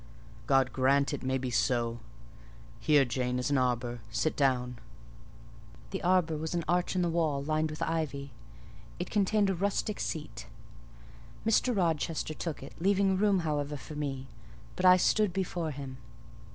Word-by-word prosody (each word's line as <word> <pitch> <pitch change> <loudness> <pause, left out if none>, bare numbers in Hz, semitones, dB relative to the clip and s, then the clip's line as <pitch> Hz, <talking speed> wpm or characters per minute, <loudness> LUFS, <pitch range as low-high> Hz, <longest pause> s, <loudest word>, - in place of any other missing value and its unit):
"God 135 -2 +3
grant 140 +2 +2
it 145 - -3
may 130 0 0
be 130 -1 -3
so! 120 -1 +1 0.8
Here, 150 -3 +4
Jane, 125 +1 -1
is 125 +2 -1
an 140 - +3
arbour; 120 -1 -1
sit 155 +7 0
down." 125 -3 +1 1.1
The - - -3
arbour 175 -3 +2
was 160 +3 -3
an 170 - 0
arch 180 +1 +1
in 180 - +2
the - - +2
wall, 155 -4 0
lined 155 +1 0
with 155 - -4
ivy; 145 -4 -2 0.7
it - - -5
contained 205 -1 +2
a - - +1
rustic 200 +3 -1
seat. 155 -3 -5 1.0
Mr. 225 +1 +2
Rochester 160 -3 0
took 155 -3 -5
it, 135 - -10
leaving 195 +1 +3
room, 195 -1 +3
however, 150 -2 -2
for 150 - -10
me: 140 -3 -3 0.5
but 185 - +3
I 185 0 +8
stood 210 +1 +2
before 175 -4 -2
him. 135 -2 -7
155 Hz, 155 wpm, -30 LUFS, 135-180 Hz, 1.1 s, I